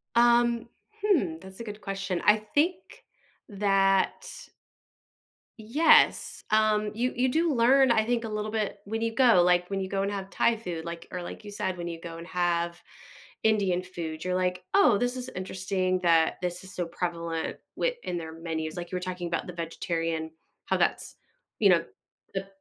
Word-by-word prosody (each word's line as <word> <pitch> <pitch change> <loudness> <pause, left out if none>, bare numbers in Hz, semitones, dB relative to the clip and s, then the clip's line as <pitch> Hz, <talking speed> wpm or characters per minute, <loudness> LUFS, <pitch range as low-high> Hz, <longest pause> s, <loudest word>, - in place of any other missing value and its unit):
Um, 235 0 +4 0.4
hmm, 300 - +2
that's 190 0 -12
a - - -5
good 210 -1 -8
question, 195 -2 -3
I 210 +1 +6
think 290 +12 +1 0.7
that 195 -2 +2 1.3
Yes, 285 +10 +4
um, 215 -1 +3
you 245 +4 0
you 250 +1 +1
do 320 +4 +1
learn, 260 +2 +5
I 220 -2 +3
think, 240 0 0
a 225 - -4
little 215 0 -3
bit 215 -2 -2
when 225 +2 -3
you 230 0 -1
go 235 -6 +5
like 180 0 +3
when 195 -1 -2
you 190 - -4
go 195 0 0
and 200 - 0
have 195 -1 -5
Thai 235 - +2
food, 175 -7 -6
like 170 0 -6
or 180 - -4
like 175 - -8
you 205 - -9
said, 190 -2 -2
when 175 0 -4
you 165 -1 -6
go 165 0 -8
and 170 - -8
have 175 -1 -1 0.6
Indian 195 -5 +2
food, 165 -4 -6
you're, 185 - 0
like, 180 0 0
"Oh, 395 - +5
this 245 +4 0
is 255 0 -5
interesting 185 0 -1
that 165 -2 +3
this 180 0 -3
is 190 0 -11
so 175 -2 -3
prevalent 170 -1 -3 0.2
wi - - 0
in 175 - -3
their 160 -1 -6
menus." 160 -1 -4
Like 175 -1 -6
you - - -3
were - - 0
talking 180 -1 -4
about 170 -1 -2
the 180 - -7
vegetarian 165 -1 -3 0.3
how - - +1
that's, - - 0 0.4
you 205 - +5
know 170 -2 +4 0.5
the 195 0 -3
190 Hz, 185 wpm, -28 LUFS, 175-220 Hz, 1.3 s, I